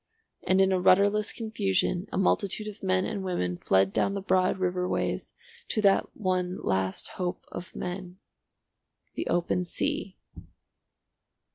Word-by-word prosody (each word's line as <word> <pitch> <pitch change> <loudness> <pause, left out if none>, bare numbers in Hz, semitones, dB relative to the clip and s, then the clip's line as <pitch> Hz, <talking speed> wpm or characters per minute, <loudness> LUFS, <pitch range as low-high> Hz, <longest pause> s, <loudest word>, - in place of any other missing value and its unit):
And 185 +1 +2
in 190 0 +4
a 185 - +2
rudderless 200 +3 +4
confusion 195 -4 -1
a - - -2
multitude 200 +2 +1
of 210 0 -8
men 185 -1 +1
and 200 -3 -3
women 90 - -2
fled 95 0 +3
down 200 - +1
the - - -1
broad 185 -1 +2
river 180 -1 -1
ways - - -2 0.3
to 215 - 0
that 195 -1 +3
one 185 -3 0
last 95 -1 -1
hope 180 -1 -3
of 180 - -8
men—the 180 +1 -9
open 175 +1 +1
sea. 185 +2 -2
185 Hz, 135 wpm, -28 LUFS, 180-195 Hz, 0.3 s, in